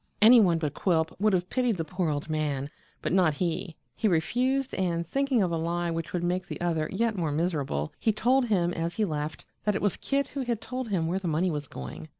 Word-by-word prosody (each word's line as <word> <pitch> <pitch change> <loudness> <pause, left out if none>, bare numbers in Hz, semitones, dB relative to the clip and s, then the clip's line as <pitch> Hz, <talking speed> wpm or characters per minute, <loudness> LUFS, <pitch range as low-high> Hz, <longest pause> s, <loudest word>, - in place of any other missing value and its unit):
Any 235 +3 +8
one 175 -6 +4
but 150 -3 -2
Quilp 160 -2 +1
would 215 +1 +3
have 180 0 0
pitied 250 -5 +1
the 165 - -2
poor 180 -1 -1
old 145 0 -2
man, 150 -3 -2 0.3
but - - 0
not 175 -5 +4
he. 170 0 -2 0.2
He 220 - +1
refused, 250 +10 +1
and 170 -3 0
thinking 270 - +1
of 180 - 0
a 165 - 0
lie 170 +1 -1
which 165 -1 -3
would 175 -1 -2
make 180 +1 -1
the - - -6
other 165 -3 0
yet 230 -1 0
more 165 -5 -1
miserable, 145 - -1
he 220 - +2
told 245 +4 +2
him 175 -5 +2
as 165 +1 -2
he 215 - +1
left 150 -3 -4 0.2
that 210 -1 +1
it - - -1
was 205 - +1
Kit 280 0 -1
who 280 - -4
had 240 -4 -1
told 255 -1 -5
him 180 -5 0
where 180 +4 0
the 190 - -4
money 170 +3 +1
was 145 -2 -4
going. 80 - -8
175 Hz, 235 wpm, -28 LUFS, 160-215 Hz, 0.3 s, Any